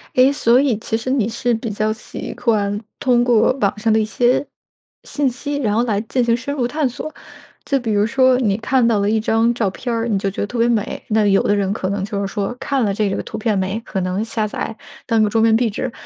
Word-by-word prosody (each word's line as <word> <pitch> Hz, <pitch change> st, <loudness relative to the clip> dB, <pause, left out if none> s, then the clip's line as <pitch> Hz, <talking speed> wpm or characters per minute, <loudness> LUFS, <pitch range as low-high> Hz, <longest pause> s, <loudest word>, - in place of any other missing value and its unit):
诶， 260 Hz, +2 st, +5 dB
所 250 Hz, -3 st, +3 dB
以 265 Hz, -6 st, +1 dB
其 220 Hz, -, -3 dB
实 230 Hz, +3 st, -3 dB
你 255 Hz, -6 st, +1 dB
是 235 Hz, +1 st, -1 dB
比 225 Hz, +1 st, -4 dB
较 215 Hz, +1 st, -1 dB
习 215 Hz, -, -7 dB
惯 210 Hz, -4 st, 0 dB, 0.2 s
通 250 Hz, -3 st, +3 dB
过 240 Hz, -2 st, +4 dB
网 200 Hz, -1 st, +1 dB
上 220 Hz, +1 st, +1 dB
的 220 Hz, -, +4 dB
一 215 Hz, -, +1 dB
些 245 Hz, +5 st, +1 dB, 0.6 s
信 285 Hz, -3 st, 0 dB
息， 285 Hz, +4 st, -4 dB
然 215 Hz, -7 st, 0 dB
后 230 Hz, -, +2 dB
来 215 Hz, -4 st, 0 dB
进 245 Hz, +2 st, -1 dB
行 230 Hz, 0 st, +2 dB
深 255 Hz, +4 st, -4 dB
入 245 Hz, -4 st, 0 dB
探 295 Hz, +1 st, 0 dB
索。 280 Hz, +5 st, -6 dB, 0.5 s
就 280 Hz, -, +1 dB
比 230 Hz, -3 st, -3 dB
如 205 Hz, 0 st, +2 dB
说 260 Hz, +2 st, +3 dB
你 210 Hz, -6 st, +1 dB
看 240 Hz, +1 st, +2 dB
到 220 Hz, -3 st, +2 dB
了 200 Hz, +1 st, +1 dB
一 220 Hz, -, +2 dB
张 225 Hz, +2 st, +2 dB
照 225 Hz, -4 st, 0 dB
片 240 Hz, +5 st, -4 dB
儿， 230 Hz, +1 st, -1 dB
你 210 Hz, -3 st, +1 dB
就 195 Hz, 0 st, -1 dB
觉 -, -, -8 dB
得 205 Hz, -, -1 dB
特 240 Hz, +3 st, -6 dB
别 235 Hz, +1 st, +3 dB
美， 225 Hz, -3 st, -1 dB
那 215 Hz, -1 st, +2 dB
有 195 Hz, -1 st, +4 dB
的 205 Hz, -, +2 dB
人 200 Hz, -1 st, 0 dB
可 185 Hz, -3 st, -3 dB
能 200 Hz, -1 st, -2 dB
就 200 Hz, -1 st, -3 dB
是 200 Hz, -, -1 dB
说 205 Hz, +2 st, -3 dB
看 270 Hz, -4 st, 0 dB
了 200 Hz, -, 0 dB
这 205 Hz, 0 st, 0 dB
个 195 Hz, -, -2 dB
图 -, -, -7 dB
片 215 Hz, -2 st, 0 dB
美 190 Hz, +3 st, -1 dB
可 195 Hz, -, -4 dB
能 185 Hz, +4 st, -1 dB
下 225 Hz, -1 st, -2 dB
载 220 Hz, +1 st, -5 dB, 0.3 s
当 225 Hz, -2 st, +2 dB
个 210 Hz, -, +3 dB
桌 225 Hz, +1 st, +1 dB
面 225 Hz, 0 st, +4 dB
壁 230 Hz, +1 st, +2 dB
纸， 250 Hz, +4 st, -4 dB
225 Hz, 280 characters per minute, -19 LUFS, 210-245 Hz, 0.6 s, 诶